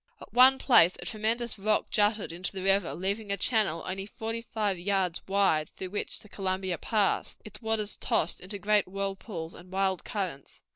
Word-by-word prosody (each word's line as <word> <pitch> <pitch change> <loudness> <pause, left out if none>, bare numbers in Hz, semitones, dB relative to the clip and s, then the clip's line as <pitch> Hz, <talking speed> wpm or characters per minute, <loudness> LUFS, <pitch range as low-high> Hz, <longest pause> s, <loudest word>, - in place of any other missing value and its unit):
At - - -13
one 260 +2 +7
place 185 -10 +5
a - - -8
tremendous 225 +1 -1
rock 215 +2 0
jutted 210 -4 +1
into 175 +2 -3
the 190 -1 -5
river, 195 -1 +2
leaving 200 +3 -2
a 200 - 0
channel 200 -6 +1
only 195 +1 -4
forty 225 +1 -4
five 210 -5 -2
yards 185 -2 0
wide 190 -6 +2
through 185 -1 -8
which 205 - -2
the - - -13
Columbia 190 -3 -2
passed, 210 -4 0
its 215 - -9
waters 220 -2 0
tossed 165 - 0
into 195 +3 -5
great 205 0 +2
whirlpools 195 -3 -4
and 180 +1 -13
wild 190 -1 0
currents. 185 -10 -5
195 Hz, 180 wpm, -29 LUFS, 185-215 Hz, -, one